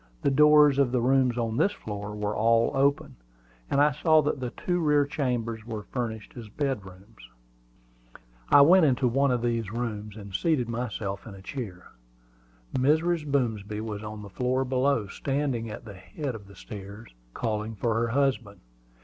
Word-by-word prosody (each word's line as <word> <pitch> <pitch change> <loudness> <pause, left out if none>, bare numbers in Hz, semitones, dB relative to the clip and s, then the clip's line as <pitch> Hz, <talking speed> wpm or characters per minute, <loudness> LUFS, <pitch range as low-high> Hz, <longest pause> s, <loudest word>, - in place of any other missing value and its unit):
The 140 - +3
doors 150 0 +6
of 135 -3 +3
the 125 - +1
rooms 130 0 +2
on 115 -1 -1
this 205 - +2
floor 105 - -6
were 105 0 -2
all 115 +2 +3
open, 140 - +1 0.5
and 140 - +1
I 150 +1 +5
saw 155 +2 +3
that 145 -1 -1
the 125 -1 -3
two 180 +7 -2
rear 150 -3 +3
chambers 120 -6 -2
were 110 -2 -6
furnished 110 -4 -5
as 115 -4 -9
bedrooms. 100 - -5 1.2
I 145 - +8
went 175 +5 +7
into 130 -1 +2
one 135 +4 +2
of 125 -2 0
these 115 -4 -1
rooms, 110 -3 -4
and 100 -2 -10
seated 145 - +1
myself 110 -4 -4
in 100 - -9
a 95 - -12
chair. 100 -9 -7 0.8
Mrs. 155 +4 +2
Boomsby 110 -6 -1
was 110 -2 -5
on 105 0 -7
the 100 - -9
floor 130 +4 0
below, 130 -2 +1
standing 135 0 -2
at 105 - -8
the 105 - -9
head 100 - -6
of 105 -3 -10
the 100 - -15
stairs, 100 - -10 0.2
calling 110 0 -2
for 115 +3 0
her 115 +2 +1
husband. 125 -5 0
120 Hz, 170 wpm, -27 LUFS, 105-140 Hz, 1.2 s, I